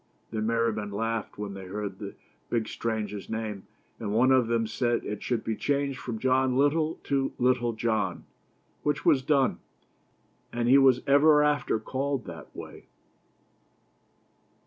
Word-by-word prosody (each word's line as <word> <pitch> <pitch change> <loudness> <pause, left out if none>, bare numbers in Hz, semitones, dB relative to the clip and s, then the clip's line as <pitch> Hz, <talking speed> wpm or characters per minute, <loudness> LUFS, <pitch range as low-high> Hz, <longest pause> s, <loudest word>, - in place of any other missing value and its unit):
The 110 -1 -2
merry 115 +1 +1
men 105 -1 -4
laughed 115 +2 -3
when 105 -1 -5
they 95 -1 -8
heard 100 0 -5
the 100 -2 -7 0.3
big 115 -2 0
stranger's 110 -3 -3
name; 110 -3 -4 0.3
and 105 -3 -3
one 120 +5 +4
of 130 -3 +4
them 115 -1 +1
said 120 +1 0
that - - -7
it 105 - -5
should 120 -3 -1
be 110 - -2
changed 140 +1 -1
from 120 -3 -4
John 130 +1 +2
Little 155 +3 +2
to 135 -1 0
Little 120 -1 +2
John, 110 -5 -1 0.6
which 150 -1 -1
was 135 - +5
done, 135 -1 +2 0.9
and 120 0 -1
he 135 +3 +7
was 130 -2 +5
ever 150 +2 +6
after 150 -6 +1
called 135 +2 -2
that - - -10
way. - - -10
120 Hz, 155 wpm, -28 LUFS, 110-135 Hz, 0.9 s, he